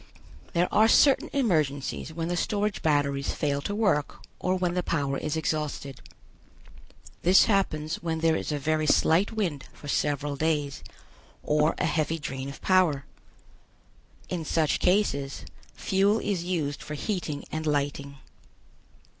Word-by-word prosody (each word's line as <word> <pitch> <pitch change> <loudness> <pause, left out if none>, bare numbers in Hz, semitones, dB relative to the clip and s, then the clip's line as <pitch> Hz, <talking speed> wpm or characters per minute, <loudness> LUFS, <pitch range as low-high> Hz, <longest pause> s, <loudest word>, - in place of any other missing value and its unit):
There 175 0 +2
are 220 +1 +6
certain 275 +4 +4
emergencies 155 - 0
when 165 +1 -3
the 175 - -1
storage 205 +3 -1
batteries 140 -2 +1
fail 140 -1 -1
to 205 +8 -3
work 200 -9 0 0.2
or 185 +1 0
when 180 -1 0
the 180 - 0
power 145 -5 -1
is 155 +1 -2
exhausted; 150 -3 -3 1.2
this 185 +2 +6
happens 165 -7 0
when 165 -1 -3
there 165 -1 +3
is - - -3
a 150 - 0
very 155 +2 0
slight 165 +6 +3
wind 180 -11 -2
for 145 - -12
several 145 0 -1
days 150 -2 -1 0.6
or 150 +1 +2
a - - 0
heavy 160 +1 0
drain 135 -3 -5
of 140 - -11
power. 175 -7 +3 1.2
In 175 -3 -3
such 155 -1 +1
cases 180 -8 0 0.3
fuel 200 +3 +2
is 200 -5 -2
used 155 -6 -2
for 150 - -6
heating 160 -3 -3
and 155 0 -3
lighting. 140 -1 -2
155 Hz, 140 wpm, -27 LUFS, 145-180 Hz, 1.2 s, are